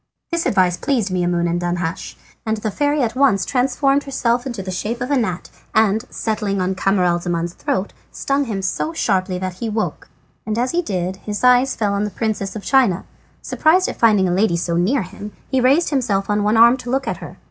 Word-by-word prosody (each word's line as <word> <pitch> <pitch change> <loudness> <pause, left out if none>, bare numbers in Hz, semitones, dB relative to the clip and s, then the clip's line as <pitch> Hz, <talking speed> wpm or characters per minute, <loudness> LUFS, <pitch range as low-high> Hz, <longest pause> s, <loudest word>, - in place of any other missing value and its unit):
This 335 0 0
advice 180 -3 +2
pleased 230 -9 -1
Maimoune 175 -1 0
and 170 +1 -1
Danhasch, 175 -1 -3 0.3
and 220 0 -1
the 215 0 -3
fairy 290 +3 +1
at 230 0 -2
once 255 -8 +3
transformed 275 +2 +1
herself 245 -2 0
into 235 -7 -5
the 185 - -5
shape 215 +6 -3
of 250 +2 -3
a - - +3
gnat 215 -8 -2 0.2
and 220 +1 +3
settling 210 -3 -2
on 185 +1 0
Camaralzaman's 175 -3 0
throat 190 +2 -2 0.2
stung 275 +1 -1
him 200 -5 -4
so 310 - -2
sharply 190 - 0
that 185 0 -5
he 230 - -3
awoke. 220 0 -3 0.5
As 245 +2 0
he 345 - +1
did 185 - -3
so - - -25
his 210 +1 -5
eyes 250 +1 +4
fell 205 -2 0
on 200 +1 0
the 210 - -1
Princess 210 -2 -3
of 210 - -6
China. 250 -10 +2 0.4
Surprised 350 +4 +2
at - - -6
finding 210 -5 +4
a 175 - 0
lady 185 -2 +2
so 170 0 -1
near 200 +9 +1
him, 205 +3 -9 0.2
he 265 -1 +2
raised 280 +8 +3
himself 210 -8 0
on 205 0 +1
one 210 +2 +2
arm 235 +3 +7
to 245 -1 -8
look 270 +2 -1
at - - -2
her. - - -10
210 Hz, 210 wpm, -20 LUFS, 185-255 Hz, 0.5 s, arm